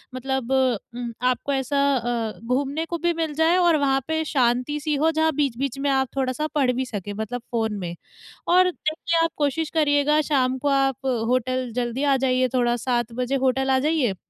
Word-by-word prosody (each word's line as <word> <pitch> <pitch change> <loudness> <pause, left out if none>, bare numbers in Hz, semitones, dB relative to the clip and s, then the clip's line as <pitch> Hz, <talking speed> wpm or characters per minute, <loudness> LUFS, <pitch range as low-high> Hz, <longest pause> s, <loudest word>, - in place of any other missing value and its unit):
मतलब 265 -1 -3
उम, 245 -2 -1 0.2
आपको 255 +3 0
ऐसा 270 +1 0 0.2
अ, 235 -3 -2
घूमने 280 +6 -1
को 340 +1 -4
भी 345 +1 0
मिल 325 -2 -2
जाए 320 +4 +3
और 345 -3 +4
वहाँ 270 -2 +2
पे 320 0 0
शांति-सी 285 +3 0
हो 315 +3 +2
जहाँ 320 0 +2
बीच-बीच 275 -2 -1
में 280 +1 0
आप 265 -1 +2
थोड़ा-सा 265 +3 -1
पढ़ 270 -4 +3
भी 260 +1 -2
सकें, 205 -4 -5
मतलब 220 +4 -4
फ़ोन 220 -3 -1
में। 175 -2 -5 0.5
और 365 +1 +5
देखिए 335 0 -2
आप 330 - 0
कोशिश 295 +2 -1
करिएगा 300 -1 +3
शाम 260 -2 +2
को 285 +3 -1
आप 270 -1 +1 0.2
होटल 255 0 0
जल्दी 245 +2 -2
आ 280 -1 +3
जाइए 255 0 +2
थोड़ा 240 -1 +2
7 240 -2 0
बजे 260 +2 0
होटल 265 +1 +1
आ 265 - +4
जाइए, 280 -6 +1
265 Hz, 185 wpm, -23 LUFS, 245-300 Hz, 0.5 s, और